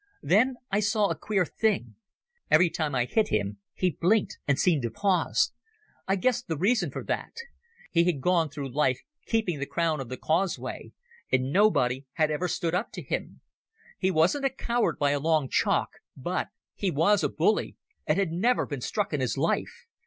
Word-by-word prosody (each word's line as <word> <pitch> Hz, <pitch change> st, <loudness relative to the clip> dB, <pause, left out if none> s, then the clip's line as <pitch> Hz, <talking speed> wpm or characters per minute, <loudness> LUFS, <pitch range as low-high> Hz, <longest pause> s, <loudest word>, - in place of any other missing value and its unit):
Then 250 Hz, +8 st, +3 dB, 0.2 s
I 200 Hz, -, +2 dB
saw 210 Hz, 0 st, +2 dB
a -, -, -1 dB
queer 195 Hz, +3 st, 0 dB
thing. 180 Hz, -, -1 dB, 0.6 s
Every 170 Hz, +2 st, +5 dB
time 155 Hz, -4 st, -2 dB
I 120 Hz, -1 st, +2 dB
hit 220 Hz, -, +1 dB
him 100 Hz, -1 st, -1 dB, 0.2 s
he 185 Hz, -1 st, +1 dB
blinked 190 Hz, +7 st, +1 dB
and 140 Hz, -2 st, +2 dB
seemed 165 Hz, -6 st, +2 dB
to 120 Hz, -, -2 dB
pause. 195 Hz, -, +1 dB, 0.5 s
I 195 Hz, -, +2 dB
guessed 245 Hz, +5 st, 0 dB
the 160 Hz, -, -2 dB
reason 195 Hz, 0 st, +2 dB
for -, -, -6 dB
that. -, -, -3 dB, 0.6 s
He 170 Hz, -1 st, +3 dB
had 175 Hz, -6 st, +1 dB
gone 170 Hz, +1 st, +2 dB
through 140 Hz, -3 st, -6 dB
life 130 Hz, -3 st, +2 dB, 0.3 s
keeping 215 Hz, -9 st, 0 dB
the 140 Hz, -, -3 dB
crown 165 Hz, -3 st, 0 dB
of 130 Hz, -3 st, -6 dB
the 130 Hz, -, -5 dB
causeway, 175 Hz, +4 st, -2 dB, 0.4 s
and 130 Hz, +1 st, +1 dB
nobody 135 Hz, -10 st, +2 dB
had 155 Hz, -1 st, +1 dB
ever 175 Hz, +4 st, -1 dB
stood 170 Hz, 0 st, -2 dB
up 180 Hz, +6 st, -1 dB
to -, -, -6 dB
him. -, -, -4 dB, 0.6 s
He 190 Hz, -, +2 dB
wasn't 185 Hz, -, +2 dB
a -, -, +4 dB
coward 240 Hz, -2 st, -1 dB
by 145 Hz, -1 st, +2 dB
a 145 Hz, -, +1 dB
long 155 Hz, -2 st, +1 dB
chalk, -, -, +1 dB, 0.3 s
but 175 Hz, +8 st, -2 dB, 0.3 s
he 200 Hz, -, -1 dB
was 175 Hz, +6 st, +3 dB
a -, -, +2 dB
bully, 180 Hz, +7 st, 0 dB, 0.3 s
and -, -, +2 dB
had 195 Hz, -4 st, +1 dB
never 225 Hz, +9 st, +2 dB
been 140 Hz, -4 st, -5 dB
struck 205 Hz, -, -2 dB
in 145 Hz, -, 0 dB
his 130 Hz, -, -1 dB
life. -, -, -1 dB
170 Hz, 190 wpm, -27 LUFS, 145-200 Hz, 0.6 s, Every